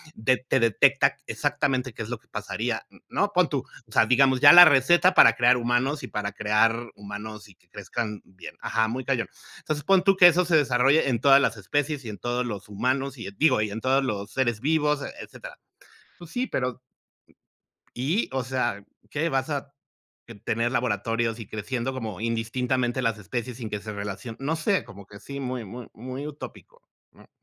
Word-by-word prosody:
de 125 +4 +1
te 130 +1 -1
detecta 115 -4 +3
exactamente 130 -3 -1
qué 115 - -6
es 110 - -9
lo 125 - -4
que - - -34
pasaría, - - -4 0.2
¿no?, - - 0
pon - - +3
tú, - - -2 0.2
o - - -23
sea, 110 - +4
digamos, 130 +2 +3
ya - - +10
la 175 0 +11
receta 160 +5 +4
para 115 - +7
crear 125 +1 +4
humanos 125 +5 0
y - - -5
para 105 0 -4
crear 115 +3 +1
humanos 105 +1 -9
y 95 - -19
que 90 - -34
crezcan 105 +2 -5
bien, 95 0 -12
ajá, 110 -1 0
muy 125 +3 -4
cañón. 130 -4 -1 0.3
Entonces, 150 -1 -4
pon 190 +3 +3
tú 195 0 +4
que 180 - +9
eso 175 +1 +3
se 170 -1 +2
desarrolle 135 +1 +3
en 120 -3 0
todas 140 0 +6
las 115 -5 0
especies 145 +6 -2
y - - -5
en 105 - -7
todos 120 +3 -2
los 105 -4 -6
humanos, 135 +6 -2
y, 115 - -7
digo, 130 -8 +3
y 110 - -1
en 110 +2 -5
todos 135 +1 +2
los 105 -5 -4
seres 120 -4 0
vivos, 150 0 +1 0.2
etcétera. - - -11 0.6
Pues 170 -2 -12
sí, 250 +1 -1
pero 125 -1 -2 1.2
¿Y? 150 - -1
O 130 -1 -1
sea, 125 -5 -2 0.3
¿qué? 155 +3 -1
Vas 135 0 -1
a 140 -1 -4 0.7
tener 115 +2 0
laboratorios 115 -1 -1
y 110 - -8
creciendo 120 +4 -4
como 110 -7 -6
indistintamente 120 +2 -1
las 115 -3 0
especies 120 +4 -5
sin 115 -4 -7
que 105 - -4
se 105 +1 -7
relacionen, 105 +3 -6
no 150 +4 -1
sé, 185 +5 0
como 100 0 -13
que 100 0 -13
sí, 140 +6 -7
muy, 125 -3 -4
muy, 120 +4 -9
muy 130 +5 -7
utópico, 310 - -11 0.3
¿no? - - -20
125 Hz, 195 wpm, -25 LUFS, 110-140 Hz, 1.2 s, la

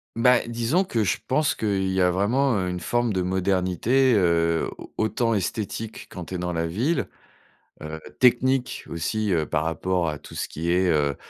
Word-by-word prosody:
Bah, 125 +1 +4
disons 120 +11 +1
que 115 - -1
je 90 - +1
pense 150 +3 +1
qu'il 100 -3 0
y 95 - 0
a 90 0 +4
vraiment, 120 +9 +2
heu, 90 -1 -1
une 90 - -3
forme 120 +5 0
de 95 -1 0
modernité, 95 +7 +2
heu, 85 -3 +2
au - - -12
autant 115 +1 +1
esthétique 110 +2 -3
quand 90 -2 -7
tu 95 - -6
es - - -1
dans 90 0 -3
la 85 0 -1
ville, 120 - 0 0.8
heu, 80 +1 -6 0.2
technique 130 +1 +2
aussi, 100 +5 -1
heu, 80 -2 +2
par 80 0 -1
rapport 85 +2 -1
à 75 -2 -4
tout - - -12
ce - - -2
qui 85 +2 -3
est, 90 +1 +3
heu 75 -4 +1
95 Hz, 190 wpm, -24 LUFS, 85-120 Hz, 0.8 s, Bah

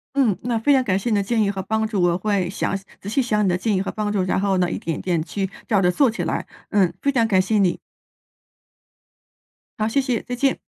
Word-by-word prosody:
嗯， 245 -9 +3
那 240 -1 0
非 280 +6 +3
常 260 -1 +4
感 190 -5 +1
谢 215 +5 -2
你 215 - +2
的 200 - +2
建 225 +2 +1
议 200 -1 +2
和 195 -1 -4
帮 220 +3 -1
助。 210 -4 -1
我 175 -1 +3
会 190 -2 0
想 195 - -2 0.2
仔 - - -11
细 265 +5 +1
想 210 -4 +1
你 - - +2
的 175 - +1
建 210 +2 0
议 185 - +1
和 195 - -3
帮 210 -1 -2
助， 195 -3 +1
然 185 - 0
后 195 -1 +1
呢 180 -1 +1
一 - - -2
点 165 -2 -3
一 - - -6
点 175 -4 0
去 190 +2 -3 0.2
照 205 -3 +3
着 180 -1 +3
做 265 +6 +3
起 220 - -3
来。 - - -2 0.2
嗯， 195 -4 +3
非 280 - +2
常 235 -4 +2
感 190 -4 +4
谢 215 +3 0
你。 185 -4 +2 2.0
好， 215 0 +1
谢 275 +5 +2
谢。 255 -4 -1
再 245 - -4
见。 270 +2 +1
205 Hz, 280 characters per minute, -22 LUFS, 185-230 Hz, 2.0 s, 常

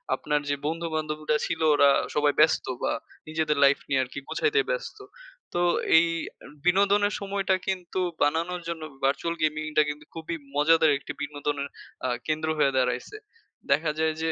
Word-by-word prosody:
আপনার 150 0 0
যে 145 - +2
বন্ধু 165 +2 -2
বান্ধবীরা 155 -1 -1
ছিল 165 -1 -3
ওরা 145 -1 +6 0.3
সবাই 150 -1 +3
ব্যস্ত - - +4 0.2
বা - - +1 0.4
নিজেদের 155 -1 0
লাইফ 140 0 +5
নিয়ে 135 -2 +2
আরকি 130 +2 -7
গুছাইতে 440 0 +1
ব্যস্ত। - - -4 0.6
তো 175 - 0 0.4
এই 170 +1 +5 0.6
বিনোদনের 200 +3 +3
সময়টা 195 -1 0
কিন্তু 185 -1 -2 0.2
বানানোর 170 +4 0
জন্য 170 -1 -4 0.2
ভার্চুয়াল 145 +5 0
গেমিংটা 155 0 +1
কিন্তু 150 0 -7
খুবই 165 +1 -5 0.2
মজাদার 160 +1 +5
একটি - - -7
বিনোদনের 145 -1 -3 0.4
আ - - 0 0.2
কেন্দ্র 155 0 -1
হয়ে 135 -3 +2
দাঁড়াইছে। 125 - -1 0.6
দেখা 150 +3 +3
যায় 160 0 +2
যে 160 0 +1
155 Hz, 150 wpm, -26 LUFS, 145-170 Hz, 0.6 s, ওরা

